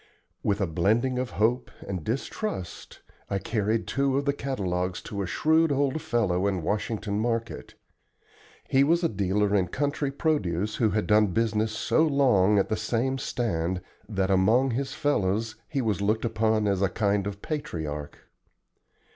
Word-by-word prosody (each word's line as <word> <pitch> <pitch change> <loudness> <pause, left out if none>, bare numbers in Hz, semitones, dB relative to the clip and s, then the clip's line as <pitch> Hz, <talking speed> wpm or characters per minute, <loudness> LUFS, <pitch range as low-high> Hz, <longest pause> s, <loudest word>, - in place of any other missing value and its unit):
With 100 0 0
a - - +3
blending 110 +10 +1
of 130 -1 -2
hope 120 +4 +1 0.2
and 90 -5 -4
distrust 120 - -4 0.3
I 100 - 0
carried 110 +2 -1
two 135 0 0
of 140 - -1
the 140 - +2
catalogues 95 -10 -2
to 100 -2 -4
a 95 - -2
shrewd 160 - +3
old 140 +2 +1
fellow 100 -7 +1
in 95 -4 -1
Washington 105 +2 -2
Market. 115 0 -3 0.9
He 135 +1 +4
was 170 +4 +2
a - - +4
dealer 100 0 0
in 95 -3 +2
country 145 - -1
produce 105 - -1
who 115 -3 +3
had 105 0 0
done 105 0 +4
business 110 +2 0
so 110 +8 +1
long 125 -10 +4
at 100 - +2
the 110 - 0
same 120 +5 -1
stand 95 -9 -1 0.3
that 95 -2 0
among 110 +8 +3
his 135 +3 -3
fellows 110 -7 0
he 140 -4 -1
was 105 -3 0
looked 110 +3 +1
upon 110 -1 +1
as 100 -1 +1
a 100 - +3
kind 100 -2 0
of 100 0 -7
patriarch. 75 - -4
110 Hz, 160 wpm, -27 LUFS, 100-130 Hz, 0.9 s, He